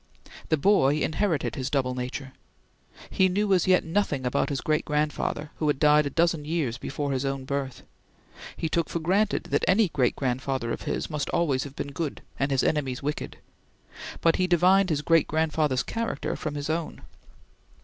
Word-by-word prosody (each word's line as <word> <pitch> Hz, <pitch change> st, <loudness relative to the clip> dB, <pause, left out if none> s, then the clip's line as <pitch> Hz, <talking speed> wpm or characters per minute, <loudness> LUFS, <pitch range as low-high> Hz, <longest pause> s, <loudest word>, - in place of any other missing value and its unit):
The 155 Hz, -, +3 dB
boy 150 Hz, -4 st, +4 dB
inherited 155 Hz, -, 0 dB
his 130 Hz, 0 st, -3 dB
double 130 Hz, -3 st, 0 dB
nature. 130 Hz, +2 st, -5 dB, 0.8 s
He 190 Hz, 0 st, +3 dB
knew 200 Hz, +2 st, +1 dB
as 185 Hz, -1 st, +2 dB
yet 185 Hz, -1 st, +4 dB
nothing 160 Hz, -6 st, -1 dB
about 125 Hz, -, 0 dB
his 140 Hz, -2 st, -2 dB
great 155 Hz, -1 st, 0 dB
grandfather, 150 Hz, 0 st, -1 dB
who 155 Hz, -, -1 dB
had 145 Hz, -2 st, +2 dB
died 150 Hz, 0 st, +4 dB
a -, -, -2 dB
dozen 165 Hz, +1 st, +1 dB
years 150 Hz, -7 st, -2 dB
before 145 Hz, 0 st, -3 dB
his 135 Hz, 0 st, -1 dB
own 135 Hz, -1 st, -3 dB
birth: 135 Hz, -1 st, -4 dB, 0.7 s
he 165 Hz, -, -1 dB
took 165 Hz, 0 st, 0 dB
for -, -, -2 dB
granted 195 Hz, +6 st, +1 dB
that -, -, +1 dB
any 200 Hz, +1 st, +4 dB
great 125 Hz, -6 st, +1 dB
grandfather 130 Hz, -2 st, -2 dB
of -, -, -4 dB
his -, -, -2 dB
must 150 Hz, -2 st, -2 dB
have -, -, -2 dB
always 140 Hz, -6 st, +1 dB
been 140 Hz, 0 st, -6 dB
good, 150 Hz, 0 st, -4 dB, 0.2 s
and 135 Hz, -, +1 dB
his 135 Hz, -2 st, +1 dB
enemies 135 Hz, -5 st, -1 dB
wicked; 150 Hz, +1 st, -4 dB, 0.8 s
but 165 Hz, -1 st, +3 dB
he 185 Hz, -, +1 dB
divined 185 Hz, +2 st, +4 dB
his 150 Hz, -2 st, 0 dB
great 165 Hz, -2 st, +3 dB
grandfather's 155 Hz, -4 st, +1 dB
character 230 Hz, 0 st, -3 dB
from 150 Hz, -2 st, -4 dB
his 145 Hz, 0 st, -3 dB
own. 160 Hz, +1 st, -3 dB
150 Hz, 180 wpm, -26 LUFS, 135-170 Hz, 0.8 s, boy